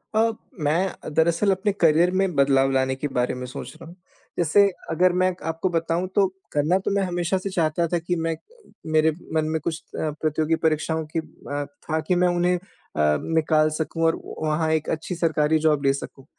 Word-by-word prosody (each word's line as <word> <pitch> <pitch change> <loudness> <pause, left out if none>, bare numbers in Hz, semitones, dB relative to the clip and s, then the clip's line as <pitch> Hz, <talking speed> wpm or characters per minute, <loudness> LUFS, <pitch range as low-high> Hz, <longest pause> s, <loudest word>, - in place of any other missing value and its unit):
अ, 225 +1 +4 0.3
मैं 160 +3 -1
दरअसल 170 +5 +3
अपने 195 +2 +1
करियर 165 +2 +5
में 190 -3 0
बदलाव 135 -1 +3
लाने 130 0 +1
के 145 +2 -3
बारे 125 0 +1
में 125 0 -5
सोच 125 - -8
रहा - - -9
हूँ। 175 - -13 0.4
जैसे 175 +5 +4 0.3
अगर 180 +2 +3
मैं 185 0 +3 0.2
आपको 165 +3 -1
बताऊँ, 165 +2 -1
तो 200 -1 +5 0.3
करना 150 +6 +2
तो - - +1
मैं 200 - +2
हमेशा 175 +1 0
से 195 +1 -4
चाहता 170 -1 0
था 175 +1 0
कि 175 +2 -2
मैं 165 -1 -1
अ, - - -18 0.5
मेरे 155 0 +3 0.2
मन 155 -1 +1
में 160 0 0
कुछ 165 -1 -3 0.2
अ, 155 - 0
प्रतियोगी 155 +1 +1
परीक्षाओं 160 0 0
की - - +3
अ, 145 -2 -6 0.3
था 160 +1 +1
कि 180 - +3
मैं 180 0 +3
उन्हें 175 +1 +2
अ, - - -3 0.4
निकाल 155 - +2
सकूँ 165 +1 -2
और 165 - +2 0.2
वहाँ 155 +1 0
एक 160 -1 0
अच्छी 160 +3 -3
सरकारी 160 -2 +2
जॉब 145 -2 +2
ले 135 - +4
सकूँ। 135 -1 -8
160 Hz, 200 wpm, -24 LUFS, 155-175 Hz, 0.5 s, करियर